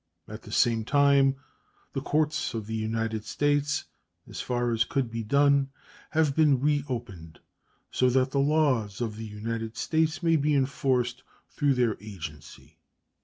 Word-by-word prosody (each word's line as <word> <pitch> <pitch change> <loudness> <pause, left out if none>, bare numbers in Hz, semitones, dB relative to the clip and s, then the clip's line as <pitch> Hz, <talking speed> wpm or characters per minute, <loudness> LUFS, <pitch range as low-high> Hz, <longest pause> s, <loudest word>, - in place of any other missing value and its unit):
At - - -9
the - - -12
same 115 -2 +2
time 140 +1 +4 0.6
the 135 - -2
courts 150 -2 0
of 110 -2 -4
the 110 - -6
United 110 0 -2
States, 145 +2 0 0.4
as - - -6
far 120 -1 -1
as 115 0 +2
could 125 -1 -2
be 115 0 -3
done, 140 +3 +3 0.4
have 155 -3 +1
been 150 -5 +4
reopened, 120 - -3 0.5
so 130 - +2
that 130 +1 +2
the 140 - 0
laws 135 -9 +1
of 115 -3 -3
the 110 0 -7
United 110 +1 -5
States 160 +1 0
may 165 -1 +4
be 150 0 +1
enforced 130 -2 0 0.3
through 145 -3 +2
their 120 -4 +1
agency. 80 -6 -10
130 Hz, 150 wpm, -27 LUFS, 110-145 Hz, 0.6 s, time